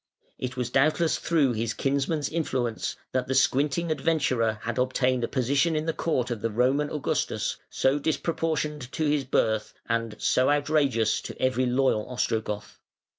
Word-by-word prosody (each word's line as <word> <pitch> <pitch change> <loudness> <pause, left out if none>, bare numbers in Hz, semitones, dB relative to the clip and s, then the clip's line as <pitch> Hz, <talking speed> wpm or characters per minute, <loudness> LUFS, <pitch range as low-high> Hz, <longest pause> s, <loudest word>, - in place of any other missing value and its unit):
It 130 0 -4
was 125 -1 -2
doubtless 155 +5 +2
through 150 -6 +2
his 115 +1 -2
kinsman's 140 +2 0
influence 130 -8 -2 0.2
that 130 -1 -1
the 130 - -1
squinting 140 +5 +2
adventurer 140 -9 +1
had 120 +1 -2
obtained 130 -1 +1
a - - +1
position 140 +5 +1
in 155 0 -1
the 165 - 0
court 130 -8 -1
of 115 -3 -3
the 115 - 0
Roman 130 +6 +1
Augustus 150 - -1
so 135 +2 +1
disproportioned 155 -3 -2
to 160 - -1
his 145 -2 +1
birth, 110 -4 0
and 115 -2 -1
so 130 - +2
outrageous 145 -6 +2
to - - -8
every 130 0 +1
loyal 125 -4 +1
Ostrogoth. 110 -4 -3
130 Hz, 155 wpm, -26 LUFS, 120-150 Hz, 0.2 s, doubtless